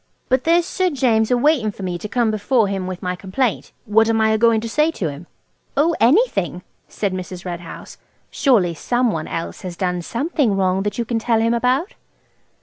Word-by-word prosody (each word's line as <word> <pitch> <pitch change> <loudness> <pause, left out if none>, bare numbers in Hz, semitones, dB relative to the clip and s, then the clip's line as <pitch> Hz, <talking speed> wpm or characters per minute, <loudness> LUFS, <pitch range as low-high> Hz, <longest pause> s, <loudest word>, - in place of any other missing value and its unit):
But 260 0 +1
there's 335 +1 +3
Sir 370 0 0
James 235 -7 +1
a 250 - +3
waiting 260 -4 +2
for 200 -1 -8
me 180 -2 -3
to 210 - -6
come 235 -2 +1
before 215 +2 +1
him 195 -2 -3
with 185 0 -6
my 180 0 -2
complaint. 205 +6 -2
What 220 +1 +3
am 225 0 +2
I 220 0 +3
a 220 - +2
goin' 230 -1 +4
to 230 - -4
say 300 +7 +2
to 190 - -3
him?" 145 +4 -9 0.5
"Oh, 320 +4 +3
anything," 230 - +2 0.2
said 200 -3 -3
Mrs. 185 0 -6
Red 175 -1 -4
House; 170 - -11 0.3
"surely 210 - +2
some 240 +8 0
one - - -4
else 165 - -5
has 180 -2 -7
done 180 -2 -1
something 245 - -1
wrong 190 0 +1
that 205 +1 -3
you 235 - -1
can 225 0 -1
tell 225 0 +1
him 230 +1 +2
about?" 255 - 0
220 Hz, 210 wpm, -20 LUFS, 185-255 Hz, 0.5 s, goin